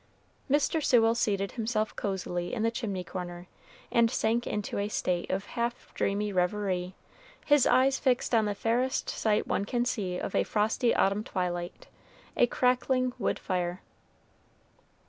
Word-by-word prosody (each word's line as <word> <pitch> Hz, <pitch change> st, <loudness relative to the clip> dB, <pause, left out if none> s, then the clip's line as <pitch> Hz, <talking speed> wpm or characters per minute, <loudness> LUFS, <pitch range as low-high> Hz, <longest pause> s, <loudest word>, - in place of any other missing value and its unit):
Mr. 295 Hz, +3 st, +2 dB
Sewell 230 Hz, -3 st, +4 dB
seated 200 Hz, -4 st, 0 dB
himself 220 Hz, -2 st, -2 dB
cozily 180 Hz, -2 st, -3 dB
in 220 Hz, -, -1 dB
the 230 Hz, -, +2 dB
chimney 205 Hz, -6 st, -3 dB
corner 175 Hz, 0 st, -6 dB, 0.5 s
and 235 Hz, -1 st, +4 dB
sank 230 Hz, +2 st, 0 dB
into 210 Hz, -1 st, -2 dB
a 200 Hz, -, 0 dB
state 180 Hz, -4 st, -1 dB
of 195 Hz, +1 st, -1 dB
half 235 Hz, 0 st, -3 dB
dreamy 205 Hz, +1 st, -1 dB
reverie; 185 Hz, 0 st, -1 dB, 0.5 s
his 290 Hz, -3 st, +5 dB
eyes 260 Hz, +2 st, +4 dB
fixed 255 Hz, -2 st, +1 dB
on 225 Hz, -2 st, +4 dB
the 205 Hz, -1 st, -1 dB
fairest 245 Hz, +5 st, 0 dB
sight 215 Hz, -1 st, +1 dB
one -, -, 0 dB
can 240 Hz, +3 st, -1 dB
see 195 Hz, -7 st, -2 dB
of 185 Hz, -, -4 dB
a -, -, +3 dB
frosty 220 Hz, +3 st, +1 dB
autumn 200 Hz, +2 st, +2 dB
twilight 175 Hz, -3 st, -3 dB, 0.5 s
a 245 Hz, -, +4 dB
crackling 255 Hz, +1 st, +1 dB
wood -, -, 0 dB
fire. 180 Hz, -1 st, -2 dB
210 Hz, 145 wpm, -29 LUFS, 190-240 Hz, 0.5 s, his